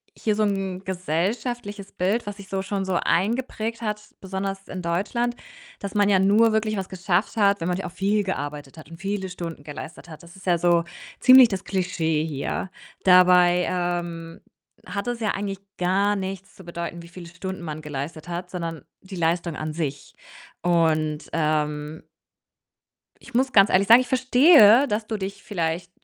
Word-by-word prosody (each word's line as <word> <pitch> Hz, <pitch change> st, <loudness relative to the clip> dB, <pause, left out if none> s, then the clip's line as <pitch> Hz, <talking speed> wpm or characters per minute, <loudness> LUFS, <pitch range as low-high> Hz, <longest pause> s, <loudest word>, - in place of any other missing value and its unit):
hier 215 Hz, -2 st, -1 dB
so 215 Hz, -, +1 dB
'n 195 Hz, -2 st, -2 dB
gesellschaftliches 200 Hz, -, -3 dB
Bild, 205 Hz, +5 st, -1 dB
was 205 Hz, -1 st, -5 dB
sich 200 Hz, -1 st, -11 dB
so 195 Hz, 0 st, -2 dB
schon 195 Hz, 0 st, -3 dB
so 190 Hz, -, -2 dB
eingeprägt 225 Hz, +6 st, -1 dB
hat, 210 Hz, -1 st, -2 dB, 0.2 s
besonders 195 Hz, 0 st, -4 dB
in 185 Hz, -1 st, -6 dB
Deutschland, 210 Hz, +8 st, -1 dB, 0.4 s
dass 200 Hz, 0 st, -6 dB
man 205 Hz, -1 st, +4 dB
ja 195 Hz, -2 st, +4 dB
nur 210 Hz, +4 st, +4 dB
wirklich 215 Hz, -1 st, 0 dB
was 190 Hz, -1 st, -3 dB
geschafft 185 Hz, +1 st, -1 dB
hat, 200 Hz, -3 st, +3 dB
wenn 165 Hz, -, -2 dB
man 180 Hz, 0 st, 0 dB
ja 190 Hz, -, -4 dB
auch -, -, -9 dB
viel 205 Hz, +3 st, 0 dB
gearbeitet 145 Hz, -6 st, -5 dB
hat 155 Hz, -, -12 dB
und 165 Hz, -, -10 dB
viele 195 Hz, +1 st, -3 dB
Stunden 170 Hz, -4 st, -7 dB
geleistet 155 Hz, +3 st, -9 dB
hat. 155 Hz, -, -11 dB
Das 170 Hz, +1 st, -15 dB
ist 190 Hz, -, -15 dB
ja 175 Hz, -2 st, +2 dB
so 170 Hz, -1 st, +3 dB, 0.4 s
ziemlich 255 Hz, -1 st, +8 dB
das 195 Hz, -3 st, -4 dB
Klischee 170 Hz, -5 st, -1 dB
hier. 150 Hz, +5 st, -3 dB, 0.3 s
Dabei, 180 Hz, -1 st, +6 dB
ähm, 175 Hz, -2 st, -3 dB, 0.4 s
hat 200 Hz, +4 st, -4 dB
es 240 Hz, -1 st, -2 dB
ja 215 Hz, -2 st, -1 dB
eigentlich 195 Hz, -1 st, -4 dB, 0.2 s
gar 195 Hz, +3 st, +1 dB
nichts 195 Hz, -1 st, -6 dB
zu 190 Hz, -, -13 dB
bedeuten, 170 Hz, 0 st, -6 dB
wie 170 Hz, -, -12 dB
viele 175 Hz, 0 st, -11 dB
Stunden 175 Hz, +1 st, -7 dB
man 155 Hz, -1 st, -6 dB
geleistet 150 Hz, +3 st, -6 dB
hat, 175 Hz, +1 st, -5 dB
sondern 165 Hz, -3 st, -5 dB, 0.2 s
die 190 Hz, 0 st, -10 dB
Leistung 170 Hz, -1 st, 0 dB
an 155 Hz, 0 st, -4 dB
sich 145 Hz, -4 st, -4 dB, 0.5 s
und, 160 Hz, -3 st, +1 dB
ähm 150 Hz, -1 st, -1 dB, 1.2 s
ich -, -, -15 dB
muss 260 Hz, +1 st, +2 dB
ganz 195 Hz, -2 st, +6 dB
ehrlich 195 Hz, +2 st, +3 dB
sagen, 230 Hz, +2 st, +9 dB
ich 255 Hz, -, -4 dB
verstehe, 260 Hz, -1 st, +6 dB
dass 215 Hz, +1 st, -2 dB
du 220 Hz, -, -3 dB
dich 200 Hz, 0 st, -6 dB
vielleicht 170 Hz, -2 st, -3 dB
185 Hz, 175 wpm, -24 LUFS, 170-205 Hz, 1.2 s, sagen